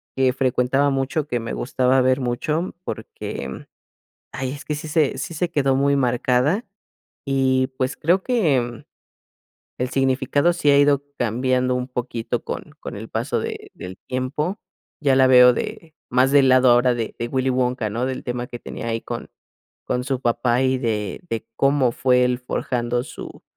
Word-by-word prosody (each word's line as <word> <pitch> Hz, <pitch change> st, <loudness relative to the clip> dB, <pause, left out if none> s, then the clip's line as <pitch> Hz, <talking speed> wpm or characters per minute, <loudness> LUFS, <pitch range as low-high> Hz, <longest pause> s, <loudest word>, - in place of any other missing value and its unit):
que 130 Hz, -1 st, +2 dB
frecuentaba 130 Hz, +1 st, +1 dB
mucho, 135 Hz, +2 st, -1 dB
que 120 Hz, -4 st, -1 dB
me 115 Hz, -, -5 dB
gustaba 130 Hz, +1 st, +1 dB
ver 130 Hz, +1 st, +2 dB
mucho, 150 Hz, +8 st, -2 dB
porque, -, -, -6 dB, 0.7 s
ay, 130 Hz, -1 st, -3 dB
es 140 Hz, +1 st, -7 dB
que 150 Hz, -, -2 dB
sí 150 Hz, +2 st, -6 dB
se 150 Hz, -3 st, +1 dB
sí 140 Hz, +5 st, -5 dB
se 170 Hz, +2 st, -1 dB
quedó 140 Hz, -5 st, +1 dB
muy 140 Hz, +1 st, +2 dB
marcada. 130 Hz, -, +1 dB, 0.6 s
Y 130 Hz, -1 st, +2 dB
pues, 130 Hz, +1 st, -1 dB
creo 175 Hz, +5 st, +2 dB
que, 140 Hz, -, 0 dB, 0.9 s
el 125 Hz, 0 st, -1 dB
significado 135 Hz, +4 st, +2 dB
sí 160 Hz, -4 st, +1 dB
ha 140 Hz, -, +5 dB
ido 145 Hz, -1 st, +4 dB
cambiando 125 Hz, +2 st, +1 dB
un 125 Hz, 0 st, -2 dB
poquito 120 Hz, -2 st, -3 dB
con -, -, -6 dB
con -, -, -7 dB
el -, -, -8 dB
paso -, -, -1 dB
de -, -, -6 dB
del 90 Hz, +1 st, -8 dB
tiempo. 145 Hz, +9 st, -2 dB, 0.4 s
Ya 140 Hz, -3 st, +3 dB
la 130 Hz, 0 st, +5 dB
veo 125 Hz, -1 st, +8 dB
de 160 Hz, +5 st, -5 dB, 0.2 s
más 130 Hz, +2 st, +3 dB
del 140 Hz, -2 st, +5 dB
lado 130 Hz, -1 st, +6 dB
ahora 120 Hz, +1 st, +4 dB
de 115 Hz, -2 st, -4 dB
de 120 Hz, -, -2 dB
Willy 130 Hz, 0 st, 0 dB
Wonka, 125 Hz, -3 st, 0 dB
¿no? 120 Hz, +4 st, -1 dB
Del 130 Hz, -1 st, -4 dB
tema 120 Hz, 0 st, -3 dB
que 120 Hz, -, -7 dB
tenía 115 Hz, -, -7 dB
ahí 115 Hz, 0 st, -2 dB
con -, -, -6 dB, 0.6 s
con 125 Hz, 0 st, -1 dB
su 135 Hz, -1 st, -1 dB
papá, 120 Hz, 0 st, +1 dB
y 130 Hz, 0 st, +2 dB
de 105 Hz, -5 st, -2 dB
de 115 Hz, -1 st, -3 dB
cómo 135 Hz, -3 st, +3 dB
fue 125 Hz, 0 st, +3 dB
él 125 Hz, 0 st, 0 dB
forjando 120 Hz, -1 st, -2 dB
su -, -, -10 dB
130 Hz, 175 wpm, -22 LUFS, 125-140 Hz, 0.9 s, veo